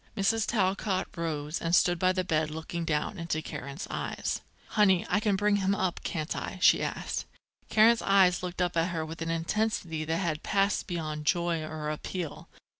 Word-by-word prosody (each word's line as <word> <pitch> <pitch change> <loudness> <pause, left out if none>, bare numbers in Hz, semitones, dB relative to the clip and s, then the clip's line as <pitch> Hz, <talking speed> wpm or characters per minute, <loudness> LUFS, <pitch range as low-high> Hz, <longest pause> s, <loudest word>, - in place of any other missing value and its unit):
Mrs. 215 +3 +2
Talcott 195 -2 0
rose 155 -2 -3
and 165 +1 +2
stood 175 -1 +3
by 185 +1 +4
the 185 0 0
bed 155 -3 0
looking 160 +2 -4
down 150 0 -1
into 165 -2 -1
Karen's 140 0 -6
eyes. - - -3 0.3
"Honey, 190 -5 +4
I 200 - +2
can 210 -2 +1
bring 205 +1 +2
him 195 0 +1
up, 190 -3 -1
can't 155 -3 -3
I?" - - -5
she - - +6
asked. - - -3 0.4
Karen's 225 +2 +5
eyes 190 -3 +4
looked 180 0 -2
up 175 -1 -1
at 165 +1 +2
her 165 -2 -2
with 165 +1 -8
an 165 - -2
intensity 165 -1 -1
that 160 +1 0
had 165 -4 -1
passed 200 0 +1
beyond 155 -4 -4
joy 170 -1 +1
or 155 -1 -4
appeal. 165 +1 -5
175 Hz, 185 wpm, -29 LUFS, 160-195 Hz, 0.4 s, she